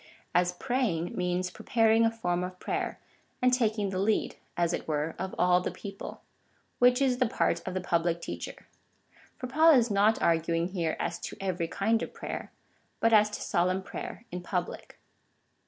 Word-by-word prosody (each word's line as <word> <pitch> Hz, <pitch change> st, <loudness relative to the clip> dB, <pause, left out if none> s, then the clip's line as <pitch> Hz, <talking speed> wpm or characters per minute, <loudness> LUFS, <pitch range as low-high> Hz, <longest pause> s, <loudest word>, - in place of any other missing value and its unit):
as 180 Hz, 0 st, +3 dB
'praying 195 Hz, -6 st, -1 dB
means 180 Hz, 0 st, -1 dB
preparing 225 Hz, +2 st, +3 dB
a -, -, +4 dB
form 180 Hz, -6 st, -1 dB
of 180 Hz, 0 st, -6 dB
prayer, -, -, -2 dB, 0.4 s
and 250 Hz, 0 st, +3 dB
taking 215 Hz, -5 st, +1 dB
the 185 Hz, -, -2 dB
lead, 210 Hz, +2 st, +1 dB, 0.2 s
as 170 Hz, 0 st, +1 dB
it -, -, -4 dB
were, 155 Hz, +1 st, -1 dB
of 190 Hz, 0 st, -4 dB
all 180 Hz, 0 st, +4 dB
the -, -, -2 dB
people 200 Hz, -1 st, -8 dB, 0.3 s
— -, -, -40 dB
which 250 Hz, +1 st, +5 dB
is 260 Hz, -3 st, +2 dB
the 255 Hz, -, +3 dB
part 170 Hz, -5 st, 0 dB
of 185 Hz, -, -3 dB
the 185 Hz, -, -1 dB
public 170 Hz, -1 st, 0 dB
teacher,^ -, -, -7 dB, 0.7 s
for -, -, -5 dB
Paul 315 Hz, +6 st, +5 dB
is 240 Hz, -4 st, +4 dB
not 205 Hz, +2 st, +3 dB
arguing 165 Hz, +1 st, +1 dB
here 170 Hz, -4 st, -1 dB
as 170 Hz, -, -2 dB
to -, -, -7 dB
every 185 Hz, -3 st, -1 dB
kind 220 Hz, +6 st, +1 dB
of -, -, -6 dB
prayer, -, -, -6 dB, 0.5 s
but 230 Hz, 0 st, +3 dB
as 210 Hz, -1 st, +6 dB
to 210 Hz, -, -6 dB
solemn 185 Hz, +2 st, +1 dB
prayer 220 Hz, -, -7 dB
in 180 Hz, 0 st, -4 dB
public. 180 Hz, 0 st, -4 dB
190 Hz, 180 wpm, -29 LUFS, 175-225 Hz, 0.7 s, as